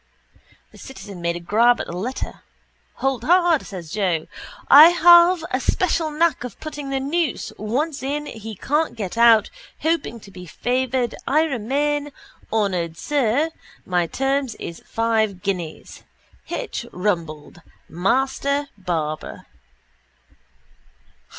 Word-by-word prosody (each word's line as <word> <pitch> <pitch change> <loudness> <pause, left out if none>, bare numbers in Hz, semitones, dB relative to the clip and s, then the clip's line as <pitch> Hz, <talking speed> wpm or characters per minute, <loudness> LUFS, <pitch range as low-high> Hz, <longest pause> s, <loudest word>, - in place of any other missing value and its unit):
_ - - -40
The - - -16
citizen 205 -9 -10
made 170 0 -1
a - - -4
grab 225 +8 +3
at - - -3
the 170 - -7
letter. 235 +9 -5 0.5
—Hold 265 -3 -1
hard, 345 0 +4
says 175 -5 -8
Joe, 180 -6 0 0.5
_i 305 +4 +10
have 345 0 +6
a 255 - 0
special 330 +2 0
nack 310 -3 +1
of 250 - -8
putting 295 -3 -6
the 270 0 -1
noose 300 +2 -2
once 275 +8 -2
in 290 +3 -3
he 220 -4 -8
can't 300 - -1
get 205 -4 -5
out 230 -2 +5 0.3
hoping 320 -7 -1
to 200 - -14
be 180 -1 -11
favoured 250 +5 -1
i 305 +3 +3
remain, 290 +2 -1 0.4
honoured 180 -7 -1
sir, 290 - 0 0.3
my 175 -2 0
terms 270 +2 -1
is 170 - -8
five 225 -3 0
ginnees._ 180 -5 -4 0.5
_H. - - -5
Rumbold, 170 -4 -3 0.3
Master 270 - 0
Barber. 160 -4 -4
245 Hz, 125 wpm, -22 LUFS, 195-290 Hz, 0.5 s, i